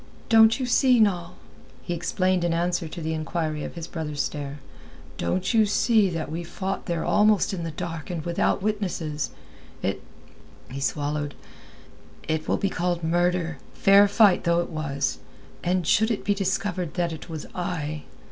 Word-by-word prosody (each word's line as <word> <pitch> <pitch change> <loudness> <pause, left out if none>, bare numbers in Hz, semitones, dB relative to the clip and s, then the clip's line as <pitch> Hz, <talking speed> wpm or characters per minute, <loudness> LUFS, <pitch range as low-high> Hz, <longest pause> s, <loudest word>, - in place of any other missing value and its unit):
"Don't 225 +2 +6
you 260 - -1
see, 250 0 +4
Noll?" 185 -6 +1 0.5
he 175 - -3
explained 180 +2 0
in 170 -1 +1
answer 175 0 0
to 170 +2 -7
the 160 0 -2
inquiry 155 -1 -2
of - - -6
his 165 -1 -5
brother's 150 -4 -3
stare, 145 -1 -5 0.6
"don't 180 - 0
you 220 -2 +5
see 210 -1 +3
that 165 -3 -4
we 170 +2 -3
fought 190 +3 -4
there 170 -2 -1
almost 210 -1 +3
in 180 - -3
the 165 - -3
dark 165 +1 -6
and 170 -4 -4
without 170 +2 0
witnesses. 180 - -2 0.5
It...." - - -1 0.7
he 135 - -5
swallowed, 145 +1 -2 0.9
"it 155 0 -1
will - - +2
be 200 - 0
called 175 -1 -1
murder, 170 -1 +1 0.2
fair 200 +1 +6
fight 200 -2 +4
though 170 -1 +3
it - - -5
was; 140 -3 -2 0.4
and 180 0 +1
should 220 +4 +3
it 220 - -2
be 205 - +3
discovered 195 -3 -2
that 170 -2 0
it 160 - -9
was 160 -2 -6
I...." 155 -4 -3
175 Hz, 165 wpm, -25 LUFS, 155-195 Hz, 0.9 s, Don't